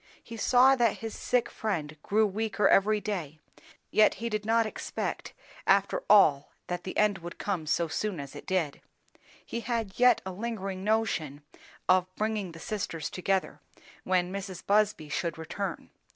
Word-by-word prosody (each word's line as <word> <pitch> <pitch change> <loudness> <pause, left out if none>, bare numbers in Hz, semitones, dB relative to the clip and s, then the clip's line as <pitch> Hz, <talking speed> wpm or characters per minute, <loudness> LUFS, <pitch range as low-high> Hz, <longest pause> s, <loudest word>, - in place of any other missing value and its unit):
He 230 - -9
saw 250 +4 +5
that 235 -4 +2
his 225 -1 -6
sick 250 -1 +1
friend 160 -9 -3
grew 215 +5 +2
weaker 210 +1 0
every 210 +2 +4
day, 175 -8 -4 0.5
yet 215 - +5
he 235 +1 -4
did 210 -1 -3
not 230 0 +3
expect 215 - -4 0.3
after - - +3
all 145 -8 +6 0.2
that 180 0 -4
the 185 - -5
end 210 -2 +3
would 170 +1 -8
come 180 -6 -3
so 170 +2 +1
soon 190 +2 -2
as 140 0 -8
it 145 - -10
did. 175 -6 -1 0.6
He 235 - -4
had 230 -4 -3
yet 250 -2 +6
a 190 - -4
lingering 195 -2 -4
notion 195 -10 0 0.4
of 185 -1 +4
bringing 210 -5 -2
the 165 - -11
sisters 165 -6 -4
together, 190 +1 -1 0.4
when 185 0 +1
Mrs. 195 -2 -6
Busby 205 -6 +2
should 165 +2 -2
return. 175 +3 -5
195 Hz, 160 wpm, -29 LUFS, 175-220 Hz, 0.6 s, all